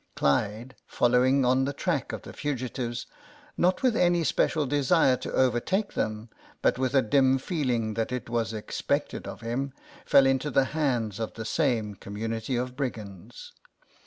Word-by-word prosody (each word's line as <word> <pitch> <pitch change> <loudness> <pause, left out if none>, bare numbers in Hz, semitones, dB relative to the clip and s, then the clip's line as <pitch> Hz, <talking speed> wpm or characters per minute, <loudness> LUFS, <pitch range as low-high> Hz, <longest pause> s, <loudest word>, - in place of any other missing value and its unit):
Clyde, 105 - 0
following 125 +2 +3
on 130 +1 +3
the 140 - -2
track 160 -1 -1
of - - -6
the - - -10
fugitives, 125 -4 -3 0.5
not 180 +6 +1
with 250 -4 +3
any 175 -4 +3
special 155 +1 +1
desire 135 -1 +3
to - - -6
overtake 130 - +1
them, 110 +1 -2 0.4
but - - +2
with 130 +1 0
a 135 - +5
dim 130 +3 +3
feeling 125 - -1
that 115 +2 -2
it 125 -1 -4
was 115 -1 -1
expected 110 -2 -3
of - - -8
him, 130 +4 -3 0.3
fell 135 - +5
into 135 +2 +1
the 135 0 +3
hands 120 -9 0
of 110 - -4
the 110 - -6
same 115 -8 0
com 100 +1 -10
munity 115 +3 -2
of 125 0 -4
brigands. 110 -9 -6
125 Hz, 160 wpm, -27 LUFS, 115-140 Hz, 0.5 s, a